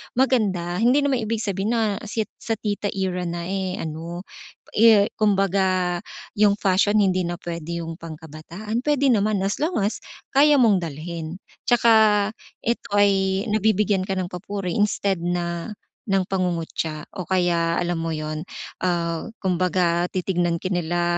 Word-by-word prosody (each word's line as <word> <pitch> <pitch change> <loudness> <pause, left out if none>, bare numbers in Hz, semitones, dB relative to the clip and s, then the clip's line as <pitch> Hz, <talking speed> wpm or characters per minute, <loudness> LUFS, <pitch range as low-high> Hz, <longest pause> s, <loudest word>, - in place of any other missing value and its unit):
maganda, 200 -9 +1
hindi 255 +5 +4
naman 275 -3 +1
ibig 225 0 -2
sabihin 200 +3 -1
na 220 -3 0
si 220 0 -1 0.2
sa 225 - -2
tita 205 -1 -2
era 180 -2 -1
na, 170 0 -4
eh, 190 0 -2
ano, 165 +3 -5 0.5
eh, 220 -1 +5
kumbaga 190 -3 +2 0.4
,yung 205 -1 +5
fashion 205 +1 +2
hindi 185 -2 +1
na 175 - -2
puwede 170 -1 -5
'yung 165 +1 -7
pangkabataan, 165 +7 -6
puwede 280 -2 +3
naman 210 -3 +2
as 195 +1 -1
long 330 +4 0
as 205 - -1 0.3
kaya 290 +2 +5
mong 230 -7 +5
dalhin. 165 +2 -6 0.2
At - - -50
saka 235 -1 +5 0.7
ito 235 +1 -2
ay 195 -1 +3
nabibigyan 210 -2 +2
ka 195 - -2
ng 185 -1 -2
papuri 180 0 -4
instead 200 -2 +1
na, 175 +3 -3 0.3
ng 195 -1 +2
pangungutya 165 -4 -2 0.2
o 185 - -4
kaya 170 -2 +1
alam 175 -1 -1
mo 165 0 -2
'yun, 155 +1 -4 0.4
ah, 170 -2 -1 0.2
kumbaga 180 -2 +1
titignan 175 -2 0
ka 185 - -2
nila 175 -1 0
185 Hz, 145 wpm, -23 LUFS, 170-210 Hz, 0.7 s, eh